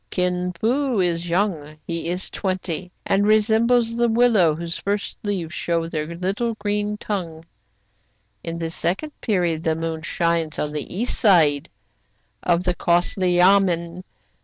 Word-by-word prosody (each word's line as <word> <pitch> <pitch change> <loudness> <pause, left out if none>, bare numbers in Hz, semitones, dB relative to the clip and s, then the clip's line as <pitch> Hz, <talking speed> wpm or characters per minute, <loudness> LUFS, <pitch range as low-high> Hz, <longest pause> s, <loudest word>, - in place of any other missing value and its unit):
Kin 180 0 0
Fo 250 +1 +1
is 175 -1 0
young, 170 -5 -1
— - - -43
he 170 0 -3
is 180 +2 -3
twenty, 185 -2 -3
— - - -45
and 200 +1 +2
resembles 225 +2 +3
the 235 0 +2
willow 225 -9 +4
whose 170 +1 -5
first 205 +1 -3
leaves 185 -6 -3
show 170 -1 -1
their 160 0 -4
little 200 +6 -2
green 210 0 -2
tongue. 170 -7 -5 0.5
" 105 -1 -44
In 165 0 -4
the 165 -1 -3
second 195 - -2
period 175 -7 0
the 160 -2 0
moon 165 0 -3
shines 165 -1 0
on 150 - -2
the 150 -1 -5
east 230 +7 -2
side 160 - +4 0.7
of 175 0 +1
the 180 -1 +1
costly 175 +1 +1
yamen. 180 -2 +3
180 Hz, 155 wpm, -22 LUFS, 165-205 Hz, 0.7 s, willow